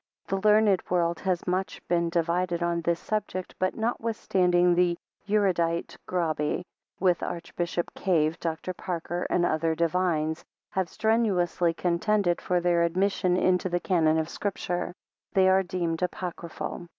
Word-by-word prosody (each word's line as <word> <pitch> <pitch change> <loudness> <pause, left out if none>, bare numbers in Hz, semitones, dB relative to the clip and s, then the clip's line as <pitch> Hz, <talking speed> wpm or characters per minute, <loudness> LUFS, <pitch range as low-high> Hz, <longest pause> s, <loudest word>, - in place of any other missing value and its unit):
The 195 - +1
learned 210 -2 +4
world 170 -1 +1
has 185 -3 -1
been 180 - -1
much 190 +1 -2
divided 170 +1 0
on 170 0 0
this 170 0 0
subject; 205 -4 -3
but, 185 0 0
notwithstanding 190 -6 +2
the 175 -1 +2 0.3
erudite 175 -5 +1
Grabe, 160 -2 -1 0.4
with 180 -2 +2
Archbishop 170 0 -3
Cave, 165 -3 +1
Dr, 165 +2 -3
Parker, 175 -1 -3
and 175 - +2
other 160 0 +1
divines, 165 -2 0 0.3
have 190 -3 -1
strenuously 185 -7 +1
contended 175 +1 +1
for 180 -1 +1
their 175 -1 +2
admission 180 +1 +1
into 185 0 +2
the 175 0 0
canon 160 -4 +2
of 160 -1 0
Scripture, 180 -2 -3 0.4
they 190 -1 +5
are 190 0 +5
deemed 175 -3 -2
apocryphal. 175 -1 -4
175 Hz, 135 wpm, -27 LUFS, 170-185 Hz, 0.4 s, they